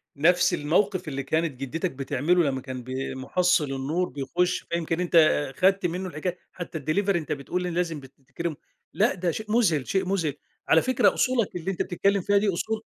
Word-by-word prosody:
نفس 175 +5 +3
الموقف 180 +4 +1
اللي 140 -1 -3
كانت 155 -2 -1
جدتك 165 +7 -2
بتعمله 145 +6 +1
لمّا 135 -2 -1
كان 130 -2 -7
بي 130 +1 -4
محصل 175 +4 +2
النور 155 +7 -1
بيخش، 175 +6 -1
فيمكن 170 0 -1
أنت 180 -1 +2 0.4
خدت 195 0 +3
منه 180 +2 -2
الحكاي 175 +3 -4
حتى 175 -2 -6
الديليفري 175 +5 +1
أنت 155 - -7
بتقول 150 +5 -2
لازم 175 -3 -1
بتكرمه. 140 +4 -7 0.4
لأ، 215 +4 +3
ده 175 -2 -1
شيء 215 +4 -6
مذهل، 175 - +2
شيء 190 -1 0
مذهل. 180 -6 0 0.3
على 160 - +5
فكرة 255 -1 +3
أصولك 250 -7 +1
اللي 180 +2 -2
أنت 185 - -3
بتتكلم 200 +2 +1
فيها 205 +3 +2
دي 205 0 +2
أصول 220 +5 -2
170 Hz, 175 wpm, -26 LUFS, 145-185 Hz, 0.4 s, على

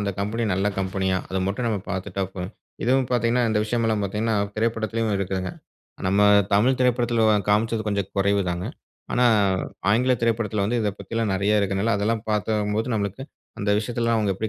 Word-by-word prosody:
அந்த 100 -1 -1
கம்பெனி 115 +3 -1
நல்ல 100 +2 +1
கம்பெனியா? 95 -1 0
அத 95 - -2
மட்டும் 105 +5 -2
நம்ம 105 - 0
பாத்துட்டா 95 +1 -3
போதும். 95 +2 -5 0.3
இதுவும் 130 +1 +2
பார்த்தீங்கன்னா 120 0 +2
இந்த 105 - +1
விஷயம் 115 +1 -1
எல்லாம் 110 -2 +1
பார்த்தீங்கன்னா, 110 +3 -1 0.2
திரைப்படத்திலயும் 115 -1 0
இருக்குங்க. 95 -1 -2 0.6
நம்ம 100 +2 +2 0.3
தமிழ் 125 +6 +3
திரைப்படத்தில 120 -2 +2 0.3
காமிச்சது 110 +1 +1
கொஞ்சம் 100 -2 -1
குறைவு 100 +1 +2
தாங்க. 90 +1 -3 0.5
ஆனா, 125 - +3 0.7
ஆங்கில 125 +5 +3
திரைப்படத்தில 110 -3 0
வந்து 120 +4 0
இத 105 - +1
பத்தி - - -12
எல்லாம் 115 -3 0
நெறைய 105 +2 +2
இருக்கிறதுனால 100 +3 0
அதெல்லாம் 110 +2 0
பார்த்தம்போது 105 +1 0
நம்மளுக்கு 100 +4 -2 0.4
அந்த 100 0 -1
விஷயத்தில 115 +2 -3
எல்லாம் 115 -1 +2
அவுங்க 100 -2 +1
எப்படி 110 +3 -3
105 Hz, 170 wpm, -24 LUFS, 100-115 Hz, 0.7 s, தமிழ்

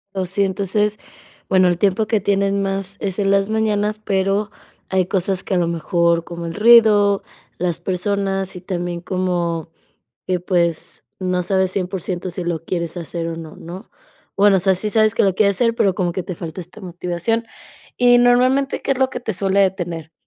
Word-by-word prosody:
Oh, 190 -1 -1
sí 195 +3 0
entonces, 205 +2 0 0.5
bueno, 185 -1 +4
el 175 -1 +1
tiempo 200 +3 +1
que 220 -1 +2
tienen 200 0 +1
más 195 0 -3
es 195 0 -3
en 195 -1 +1
las 195 0 +3
mañanas, 215 -1 0
pero 195 +1 0 0.4
hay 190 -2 +2
cosas 190 0 -1
que - - -3
a - - +2
lo 175 -1 +1
mejor 170 0 +1
como 170 0 -7
el 165 - -6
ruido, 210 -3 +6 0.4
las 175 -2 -1
personas 195 0 -2
y 180 - -8
también 175 -2 -4
como 175 -3 -2 0.6
que 185 -1 0
pues 170 -2 -1 0.2
no 180 -1 0
sabes 190 +1 +1
100% 185 -1 -3
si 180 0 -5
lo 170 -1 -3
quieres 170 -1 -3
hacer 170 0 -4
o 165 - -4
no, 160 -1 -9
¿no?, 180 +6 -10 0.5
bueno, 200 -1 +5
o - - +3
sea, 190 +1 +2
sí 210 +4 -2
sabes 215 0 +3
que - - +2
lo 195 -2 +2
quieres 200 -1 +2
hacer 230 -2 +2
pero 195 -5 +2
como 175 -1 -1
que 185 - -3
te 180 - -6
falta 165 +1 -7
esta 180 +5 -15
motivación 180 +5 -2 0.5
y 245 0 +6
normalmente, 250 +3 +3
¿qué - - 0
es 265 - -4
lo 265 0 +2
que - - -5
te 225 - -3
suele 195 +1 +1
detener?, 175 -4 -1
190 Hz, 190 wpm, -20 LUFS, 175-205 Hz, 0.6 s, ruido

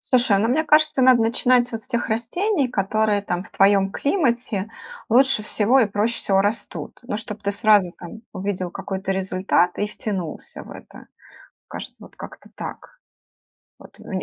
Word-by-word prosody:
Слушай, 245 -6 +2
ну 225 +3 +1
мне 310 +6 +1
кажется, 305 -3 +3
надо 255 -2 +6
начинать 245 +1 +2
вот 225 -1 -5
с - - -10
тех 235 0 -2
растений, 270 - 0
которые 210 -1 +1
там, 180 -1 -3
в - - -16
твоем 195 0 +3
климате 240 - -1 0.4
лучше 265 -1 +4
всего 220 +4 +2
и 230 - +4
проще 210 +3 -1
всего 195 -1 +1
растут. 210 +3 -4
Ну 240 - -4
чтоб 215 -1 -8
ты 200 - -1
сразу 205 -4 +3
там 220 +6 -10
увидел 185 -2 -3
какой-то 195 +1 -4
результат 185 -1 0
и 205 - 0
втянулся 190 -6 -6
в - - -13
это. - - -13 0.6
Кажется, - - -9
вот - - -15
как-то - - -11
так. - - -9 0.8
Вот - - -16
мн 190 -2 -5
215 Hz, 165 wpm, -22 LUFS, 195-245 Hz, 0.8 s, надо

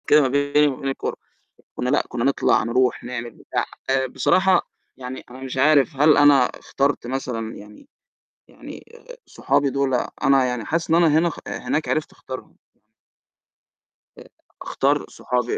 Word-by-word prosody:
كده 150 - +6
ما 135 - +2
بيني 145 +2 +2
وما 135 -3 -3
بين 135 - -2
الكورة. 135 - -4 0.6
كنا 125 - -2
لأ، 145 - +2
كنا 120 -1 -3
نطلَع 140 0 +2
نرُوح 125 +2 0
نعمل 120 -1 -5
بتاع، - - -4 0.4
بصراحة 185 +8 +2 0.3
يعني 130 0 -8
أنا 125 - -11
مش 130 0 -6
عارف 145 +1 +3
هل 150 +2 +5
أنا 145 -3 +6
اخترت 140 -2 -1
مثلًا 120 -3 -4
يعني 105 - -14 0.6
يعني - - -12 0.4
صحابي 140 -1 0
دُول 135 0 -1 0.3
أنا 135 -1 +4
يعني 125 -3 -3
حاسس 165 +6 -2
إن 165 - +4
أنا 170 0 +5
هنا 170 +2 +3
اخ 165 - -5
هناك 155 - -3
عرِفت 155 - -1
اختارهم. 130 0 -10 1.6
آآ، - - -13 0.4
أختار - - +1 0.2
صحابي 125 -1 -2
135 Hz, 150 wpm, -22 LUFS, 125-145 Hz, 1.6 s, كده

